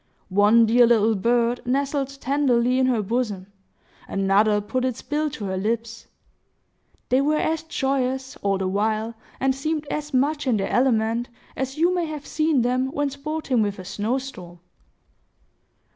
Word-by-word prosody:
One 205 +4 +5
dear 235 +2 +5
little 225 -1 +4
bird 235 +4 +1
nestled 275 +1 -1
tenderly 255 -2 +2
in 260 - +3
her 235 -5 +1
bosom; 210 -3 -2 0.6
another 200 +2 +2
put 250 +5 -2
its 255 -2 -2
bill 300 0 -1
to 270 -8 -6
her 190 -1 -2
lips. 230 +3 -3 1.0
They 260 +2 +3
were 300 +2 +2
as 315 +1 0
joyous, 265 -4 -2
all 200 -1 0
the 190 0 -2
while, 215 +3 -1 0.3
and 265 0 +2
seemed 305 +3 -2
as 300 0 -4
much 290 +2 +1
in 240 -4 +3
their 195 -1 -2
element, 235 -2 +1 0.3
as 265 +2 -4
you 345 +3 +3
may 350 -2 -1
have 300 -2 -6
seen 310 -5 +1
them 255 +2 +1
when 290 0 -1
sporting 280 -3 -2
with 205 -1 -1
a 185 - -9
snow 215 +7 -1
storm. 180 -10 -9
250 Hz, 160 wpm, -23 LUFS, 220-275 Hz, 1.0 s, One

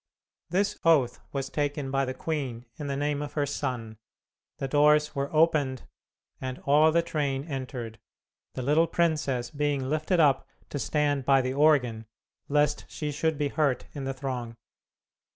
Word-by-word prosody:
This 195 +4 0
oath 145 -7 +3
was 135 -1 -3
taken 145 -2 -2
by 135 0 +1
the 130 0 -4
queen 135 -7 -3
in 145 - -4
the 140 - -2
name 145 0 -1
of 145 - -5
her 145 -2 +1
son, 120 -5 -4 0.6
the 135 - -3
doors 150 +2 +4
were 140 0 -2
opened, 155 -5 +2 0.6
and 130 -1 -4
all 150 +3 +5
the 170 +1 +3
train 140 -5 -1
entered, 130 -6 -6 0.6
the 130 - -3
little 155 +5 +3
princess 150 -8 0
being 145 -3 -1
lifted 155 +5 0
up 140 -4 +4 0.2
to 145 - -4
stand 145 -1 0
by 135 +1 +4
the 130 0 -2
organ, 130 -7 +3 0.4
lest 150 +1 +2
she 150 -2 -4
should 160 +1 0
be 145 -1 0
hurt 145 -5 0
in 140 -2 -5
the 135 - -2
throng. 125 -4 -4
145 Hz, 160 wpm, -27 LUFS, 130-150 Hz, 0.6 s, all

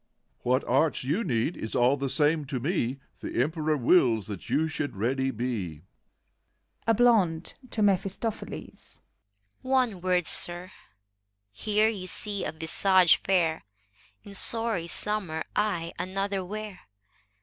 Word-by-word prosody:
What 130 +2 +2
arts 140 +3 +2
you 155 - 0
need, 125 - 0
is 110 - -5
all 125 +3 +4
the 140 -1 -2
same 150 +1 +2
to 135 -2 -3
me; 135 -3 -1 0.2
The - - -4
Emperor 155 +3 +1
wills 120 - +4
that 100 -4 -7
you 160 +1 +2
should 145 -4 -3
ready 130 +6 0
be. 110 - -3 1.0
A 225 - +5
BLONDE 200 -9 +3 0.2
(to 220 - -2
MePHISTOPHBLES). 200 +3 -2 0.6
One 255 -7 +1
word, 180 -1 +2
Sir! 175 +1 0 0.8
Here 210 - +2
you 195 -4 -5
see 205 +1 -3
a - - -2
visage 175 +3 +4
fair, 170 -4 +1 0.3
— 100 0 -32
In 200 - -11
sorry 225 -3 -1
summer 185 -5 0
I 180 -6 0
another 195 +1 -2
wear! 210 0 -6
165 Hz, 130 wpm, -28 LUFS, 135-200 Hz, 1.0 s, A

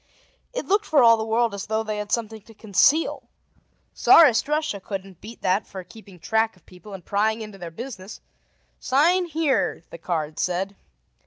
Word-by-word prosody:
It - - -4
looked 410 +2 +1
for 290 -5 +4
all 230 -1 +7
the 220 - -3
world 225 0 0
as 200 -1 -6
though 220 +1 -1
they 215 -1 -4
had 210 0 -6
something 220 -2 -2
to 225 +2 -18
conceal; 230 - +1 0.7
Czarist 280 -9 +6
Russia 300 -8 -1
couldn't 195 -2 -8
beat 230 +2 -12
that 190 +3 +1
for 190 -1 -8
keeping 200 -1 -15
track 220 +4 0
of 185 - -27
people 195 +3 -12
and 180 - -12
prying 220 +2 0
into 210 -2 -9
their 175 -2 -7
business. 205 +1 -9 0.6
Sign 340 +7 +2
here, 310 - -1
the 170 - -10
card 160 -3 -3
said. 190 +2 -2
220 Hz, 175 wpm, -23 LUFS, 195-245 Hz, 0.7 s, all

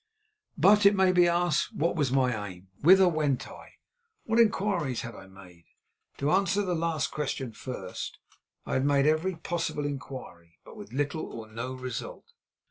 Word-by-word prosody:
But, 205 +6 +5
it 200 - +5
may 190 -1 +4
be 175 -1 +5
asked, 175 -2 +1
what 165 +3 0
was 145 -6 0
my 125 -6 +1
aim, 90 +1 -13
whither 190 +4 +7
went 150 -6 0
I, - - -13 0.5
what 225 +1 +1
inquiries 195 - +1
had 120 0 -7
I 95 -2 -12
made? 90 -3 -16 0.5
To 145 +2 0
answer 195 +1 +2
the 180 -2 -1
last 165 -2 -1
question 135 -4 -3
first, 105 -5 -7 0.5
I - - -4
had 130 - +1
made 140 -1 +3
every 155 +5 +1
possible 165 -3 -3
inquiry, 130 -12 -7
but - - -13
with - - -11
little 145 +4 -2
or 115 -1 -8
no 115 +4 -5
result. 130 -2 -7
145 Hz, 165 wpm, -28 LUFS, 125-175 Hz, 0.5 s, whither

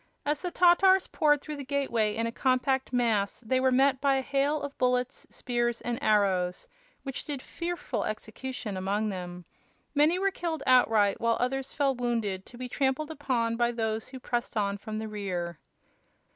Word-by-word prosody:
As 295 0 0
the 360 - -2
Tatars 365 +2 +5
poured 295 -2 +2
through 300 -1 -6
the 280 - -5
gateway 255 -6 0
in 230 - -1
a 230 - -2
compact 260 +1 +1
mass 225 -5 +1
they 255 +3 +1
were 260 0 +3
met 265 +1 +3
by 280 -1 +3
a 265 - 0
hail 280 +3 +1
of 285 0 -5
bullets, 250 0 0
spears 240 -1 -1
and 240 -1 -3
arrows, 190 -4 +1 0.4
which 270 -2 -5
did 290 -3 -4
fearful 335 -8 -4
execution 220 0 -5
among 200 +3 -1
them. 180 -2 -6 0.5
Many 305 +4 +4
were 390 +1 +1
killed 335 -4 -3
outright, 225 -6 +4
while 230 0 +2
others 270 +2 -1
fell 280 -2 +1
wounded 230 -6 -2
to 240 - -13
be 250 0 -5
trampled 270 +4 -1
upon 245 -6 -1
by 240 0 +2
those 220 -2 -2
who 260 - -9
pressed 240 -2 -3
on 200 -1 0
from 215 +1 -5
the 220 0 -4
rear. 180 -6 -4
250 Hz, 175 wpm, -28 LUFS, 215-275 Hz, 0.5 s, Tatars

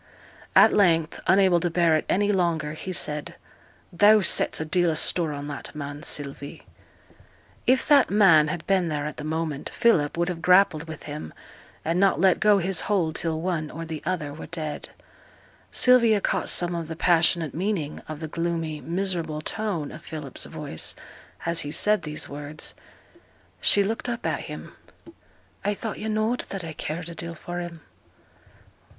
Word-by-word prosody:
At - - +7
length, 165 -6 +2
unable 190 -2 +5
to 175 +1 -1
bear 170 -1 +3
it 155 - -1
any 205 +2 +2
longer, 170 -5 0
he 185 +4 -6
said, 150 -4 -2 0.6
'Thou 205 +4 +6
sets 180 - +3
a 160 - -2
deal 175 +2 +2
o' 160 - 0
store 165 0 +1
on 145 0 -5
that 145 +1 -6
man, 145 0 -6
Sylvie.' 140 -2 -4 1.0
If 260 +1 +3
'that 285 -3 +5
man' 180 -7 +5
had 160 +1 -4
been 190 -3 +2
there 145 -2 -2
at 150 - -5
the 150 - -6
moment, 155 -2 -3
Philip 165 -11 +2
would 170 0 +1
have 175 -2 -4
grappled 180 -3 +4
with 160 -1 -8
him, 145 - -7 0.5
and 165 +3 0
not 195 -3 +3
let 185 0 +4
go 210 -1 +5
his 190 -2 0
hold 180 -7 0
till 160 -1 -1
one 165 -4 -2
or 165 +1 -7
the 160 -2 -6
other 155 -5 -3
were 155 - -9
dead. 155 -3 -5 0.8
Sylvia 235 -4 +5
caught 190 -1 -1
some 175 0 +2
of 170 -2 -4
the 165 - -6
passionate 170 -2 +2
meaning 175 -4 -2
of 155 0 -7
the 160 - -4
gloomy, 165 -1 -3
miserable 170 -4 -3
tone 185 -5 -3
of 155 +2 -11
Philip's 150 -4 -6
voice - - -4 0.5
as 170 0 +1
he 145 - -3
said 210 +7 +2
these 150 -1 -4
words. 145 +2 -5 0.9
She 200 - +4
looked 225 +4 -3
up 235 0 -4
at - - 0
him. - - -8 0.9
'I 205 +1 0
thought 220 0 -5
yo' 220 - -4
knowed 215 +3 0
that 195 -2 -5
I 160 -1 -6
cared 160 +3 -5
a - - -7
deal 170 0 -6
for 175 +2 -6
him.' 170 -2 -7
170 Hz, 175 wpm, -25 LUFS, 155-190 Hz, 1.0 s, At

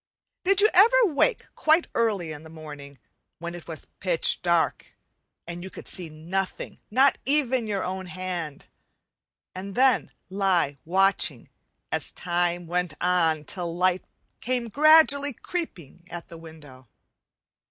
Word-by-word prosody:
Did 395 +2 +4
you 425 - +6
ever 465 +6 +6
wake 455 - +2
quite 315 +2 +3
early 205 -8 0
in 150 -1 -8
the 160 - -13
morning, 145 -3 -10 0.4
when 170 +1 -6
it 175 -1 -10
was 160 -2 -6
pitch - - +1
dark - - 0 0.5
and 175 0 -7
you 190 - -7
could - - -11
see 180 -4 -3
nothing, 175 +5 -4
not 265 +5 +4
even 260 -4 +1
your 200 -2 -1
own 185 0 -4
hand; 180 -5 -5 0.9
and 190 +1 -7
then 260 -1 +3 0.2
lie 185 -7 0
watching 195 +3 +1 0.4
as - - -1
time 175 -1 -1
went 175 -1 -2
on 165 -4 +2
till 180 +1 -3
the 165 - -5
light 185 0 +2 0.4
came 245 -1 -2
gradually 290 +1 +5
creeping 220 - -6
in - - -19
at 170 -1 -8
the 165 - -10
window? 150 -6 -14
185 Hz, 140 wpm, -25 LUFS, 165-255 Hz, 0.9 s, you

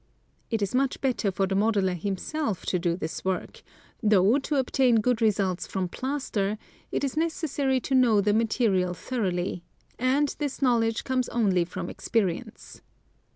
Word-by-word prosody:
It 225 -3 0
is 200 - -2
much 265 +1 +1
better 250 -6 0
for 195 +1 0
the 190 - -2
modeler 200 -2 +2
himself 200 - -3
to 180 - 0
do 170 0 0
this 160 -3 -5
work, 190 -1 -3 0.4
though 210 +3 +4
to 290 +2 -2
obtain 260 -2 +3
good 230 +1 +2
results 195 -4 +1
from 190 -2 -2
plaster 220 -5 -2 0.3
it - - -1
is 275 0 -1
necessary 305 -5 0
to 270 - -3
know 245 -5 +5
the 205 +1 +2
material 210 -5 +1
thoroughly, 180 -7 -2 0.4
and 270 +3 +1
this 290 -3 -3
knowledge 230 -4 +2
comes 255 -2 -1
only 195 -7 +2
from 175 0 -6
experience. 220 +2 -3
220 Hz, 155 wpm, -26 LUFS, 190-260 Hz, 0.4 s, know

